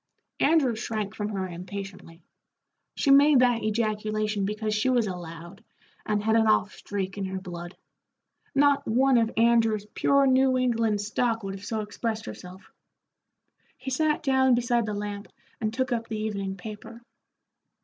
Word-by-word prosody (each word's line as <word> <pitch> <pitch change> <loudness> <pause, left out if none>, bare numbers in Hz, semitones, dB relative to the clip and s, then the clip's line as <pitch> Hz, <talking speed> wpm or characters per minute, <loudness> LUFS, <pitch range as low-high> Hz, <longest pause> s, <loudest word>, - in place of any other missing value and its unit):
Andrew 280 -6 +3
shrank 215 -2 -4
from 210 -1 -4
her 195 -3 -3
impatiently. 185 -1 -8 0.7
She 280 - +2
made 280 -1 +6
that 245 -2 +3
ejaculation 215 -1 -1
because 215 +1 -2
she 215 +4 +1
was 245 -3 +2
a 190 -3 -3
Loud, 170 +4 -10 0.4
and 210 -1 0
had 220 +1 +2
an 225 -1 +4
off 215 -1 +2
streak 195 -1 -5
in 195 - -2
her 190 0 -4
blood. 175 -1 -8 0.8
Not 285 0 +3
one 255 +2 +4
of 225 -1 +1
Andrew's 225 -2 +3
pure 280 0 +3
New 260 0 +3
England 230 -4 +1
stock 225 +2 -1
would 195 0 -4
have 195 0 -9
so 220 0 -2
expressed 220 +1 -4
herself. 185 +1 -10 1.1
He 265 0 -6
sat 305 +3 +1
down 265 -2 +4
beside 240 -1 +1
the 210 - -3
lamp 205 0 -5 0.3
and 215 -1 -1
took 260 +3 -2
up 230 -1 -1
the 220 - -4
evening 200 -3 -3
paper. 220 +4 -10
215 Hz, 160 wpm, -26 LUFS, 200-245 Hz, 1.1 s, made